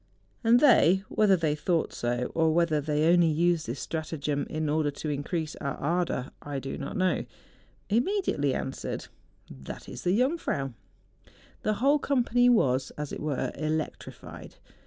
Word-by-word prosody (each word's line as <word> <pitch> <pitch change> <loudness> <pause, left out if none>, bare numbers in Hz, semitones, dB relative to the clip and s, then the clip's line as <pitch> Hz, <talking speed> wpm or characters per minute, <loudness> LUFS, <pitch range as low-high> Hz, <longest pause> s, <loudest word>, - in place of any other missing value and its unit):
And 235 +1 +6
they—whether 200 - +4
they 160 -3 +1
thought 165 +2 0
so, 120 +1 -2
or 160 -1 +3
whether 170 -3 +2
they 150 +1 0
only 175 -1 +5
used 170 +1 +1
this 120 +4 -4
stratagem 150 -3 -3
in 155 -1 -2
order 150 0 +1
to 145 +2 -5
increase 155 +2 -3
our 140 - -3
ardour, 165 -4 -1
I 145 -1 -5
do 135 0 -4
not 140 - -5
know 185 0 +1 0.3
— - - -31 0.3
immediately 235 - +1
answered, 135 - -4 0.3
' - - -20 0.2
That - - -8
is - - -8
the 180 +3 +2
Jungfrau! 250 - 0 0.4
' - - -28
The 215 - +1
whole 275 +7 +3
company 245 -3 +2
was, 130 - +3
as 150 -1 -5
it - - -5
were, 140 -4 -2
electrified. 155 +1 -5
160 Hz, 155 wpm, -28 LUFS, 145-195 Hz, 0.4 s, And